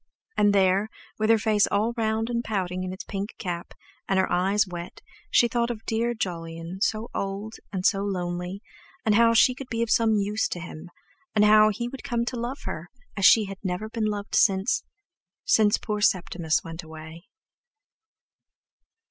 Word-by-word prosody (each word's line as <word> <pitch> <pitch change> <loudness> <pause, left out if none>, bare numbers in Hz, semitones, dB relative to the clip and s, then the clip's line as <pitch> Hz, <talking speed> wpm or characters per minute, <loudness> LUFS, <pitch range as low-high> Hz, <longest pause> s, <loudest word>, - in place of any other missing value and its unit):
And 205 0 +4
there, 195 +1 +3 0.3
with 215 0 +1
her 225 - +6
face 215 -1 +2
all 220 +3 0
round 225 0 -1
and 235 0 -1
pouting 185 -4 -2
in 185 - -4
its 185 - -7
pink 200 +1 -5
cap, 175 -2 -5 0.3
and 195 - +2
her 190 - +1
eyes 195 +4 +2
wet, 175 -2 -8 0.3
she 240 - +5
thought 235 0 0
of 225 -2 -6
"dear 235 +2 0
Jolyon," 165 -2 -5
so 220 +1 -1
old 200 +3 -4 0.2
and 190 -2 -3
so 195 - +4
lonely, 180 0 -3 0.4
and 215 - +4
how 230 +1 +5
she 250 +3 +6
could 255 0 -9
be 230 0 0
of 230 - -3
some 225 -1 +3
use 210 +1 0
to 175 - -5
him; 175 -1 -9 0.5
and 210 0 +5
how 215 0 +7
he 235 +3 -3
would 260 +1 -8
come 235 -1 -1
to 250 - -3
love 240 +3 -4
her, 165 +2 -6 0.3
as 200 -2 +5
she 220 -2 +6
had 195 0 -8
never 190 +3 -3
been 225 -1 -2
loved 205 -1 -3
since—since 220 - +1
poor 210 -1 -3
Septimus 170 -5 +1
went 165 0 -7
away. 160 +2 -11
205 Hz, 175 wpm, -26 LUFS, 185-225 Hz, 0.5 s, how